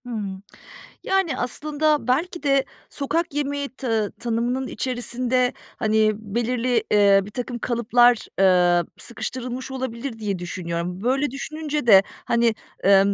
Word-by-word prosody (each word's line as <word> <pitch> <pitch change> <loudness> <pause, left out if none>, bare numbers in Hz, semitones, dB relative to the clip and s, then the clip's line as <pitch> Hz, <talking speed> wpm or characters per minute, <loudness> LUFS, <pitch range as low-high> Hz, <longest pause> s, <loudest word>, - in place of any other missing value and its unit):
Hımm. 200 -5 -5 0.6
Yani, 385 -8 +1
aslında 300 +2 0
belki 335 +7 0
de 275 -2 +3 0.3
sokak 315 +3 -2
yemeği 285 -1 -2
ta 225 -6 -2
tanımının 240 +3 -2
içerisinde, 250 0 -1 0.2
hani, 215 0 +2
belirli, 235 +3 -1
eee, 200 -1 +6
birtakım 240 +4 -5
kalıplar, 240 0 +3
eee, 180 -2 +5 0.2
sıkıştırılmış 255 +2 -5
olabilir, 255 -2 -5
diye 205 -4 -2
düşünüyorum. 175 +1 -4
Böyle 270 +4 +1
düşününce 300 +1 -4
de, 195 -4 +8 0.2
hani, 235 -1 +2 0.3
emm, 195 +1 +5
240 Hz, 115 wpm, -23 LUFS, 210-270 Hz, 0.6 s, de